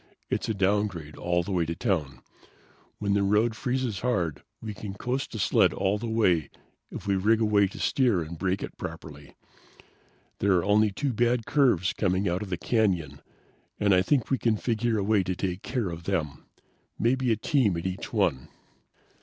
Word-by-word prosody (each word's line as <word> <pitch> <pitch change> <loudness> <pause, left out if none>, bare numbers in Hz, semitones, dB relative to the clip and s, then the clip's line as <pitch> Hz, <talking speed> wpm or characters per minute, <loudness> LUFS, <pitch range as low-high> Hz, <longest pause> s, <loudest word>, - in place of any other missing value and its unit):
It's - - -1
a 110 - 0
downgrade 95 -5 0
all 85 0 0
the 100 - -6
way 90 -3 +1
to 85 +1 -3
town. 80 - -2 0.7
When 100 -1 -1
the 100 - +2
road 105 +4 +2
freezes 125 -5 -2
hard 90 - -1 0.2
we 110 -2 -6
can 100 -1 -7
coast 125 +3 -3
a - - -2
sled 100 - +3
all 100 +2 0
the 115 +1 -4
way 90 -10 +2 0.4
if - - -8
we 100 -1 +1
rig 110 +4 +3
a 110 - +2
way 100 -2 +4
to 95 - -11
steer 120 -10 +2
and 80 +2 -8
brake 95 +3 -1
it - - -8
properly. 75 -1 -8 1.0
There 100 0 +3
are 90 -2 +2
only 105 +1 +4
two 130 +7 -2
bad 120 0 +1
curves 120 - +2
coming 95 -1 0
out 90 +2 -1
of 105 - -5
the 90 - -2
canyon, 90 - 0 0.6
and 100 -1 +3
I 90 - +5
think 130 +6 +1
we 135 - +2
can 115 -2 +1
figure 115 0 0
a 100 - 0
way 105 0 +3
to 95 0 -2
take 90 0 -3
care 120 -8 -2
of 85 0 -8
them. 80 -7 -2 0.5
Maybe 125 +2 +1
a - - +4
team 110 - +1
at 85 - -5
each 95 +1 -4
one. 65 -1 0
100 Hz, 195 wpm, -27 LUFS, 90-115 Hz, 1.0 s, I